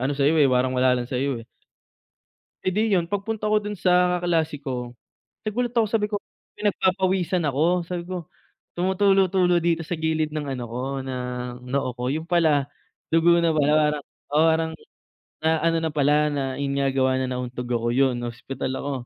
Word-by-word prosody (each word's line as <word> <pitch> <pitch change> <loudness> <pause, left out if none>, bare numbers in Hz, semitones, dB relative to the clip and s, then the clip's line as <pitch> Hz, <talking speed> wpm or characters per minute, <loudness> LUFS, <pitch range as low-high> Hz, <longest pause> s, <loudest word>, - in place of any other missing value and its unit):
ano 130 +3 0
sa'yo, 145 +3 +2
eh, 145 -3 +5
parang 125 0 +2
wala 125 0 +4
lang 120 0 -4
sa'yo, 130 -1 -1
eh. 115 - -14 1.2
Eh, 185 - +2
'di 210 +1 +2
yun 170 0 -1
pagpunta 215 +1 -2
ko 215 - +4
dun 210 0 -5
sa 180 -1 +2
kaklase 160 -3 +1
ko, 125 -2 -4 0.5
nagulat 240 +3 -2
ako 230 - +4
sabi 210 -2 +1
ko, 210 - -3 0.4
“Pinagpapawisan 190 -3 +1
ako." 165 +5 +1
Sabi 175 0 -5
ko, 180 -2 -4 0.5
"tumutulo-tulo 190 -1 +3
dito 165 -1 0
sa 160 0 -4
gilid 160 -1 0
ng 150 -2 -4
ano 125 - -5
ko, 125 - -4 0.2
ng 125 -1 -5
noo 130 -1 -1
ko.” 125 +1 -4
Yun 155 +4 -1
pala, 155 -5 +2 0.4
dugo 170 +1 +5
na 165 - +3
pala, 150 -2 +2 0.2
parang 150 -1 -5 0.3
o - - -2
parang 160 0 +2 0.7
na 160 +1 +1
ano 165 0 +3
na 160 - -1
pala, 150 0 +2
na 145 -2 -1 0.2
ayun 140 -1 -1
nga 140 -1 +1
gawa 130 -1 +2
ng 130 - -3
nauntog 125 -1 -4
ako. 120 0 0
Yun, 130 -2 +2
na-ospital 120 +2 -5
ako 140 +1 -3
155 Hz, 180 wpm, -24 LUFS, 130-180 Hz, 1.2 s, eh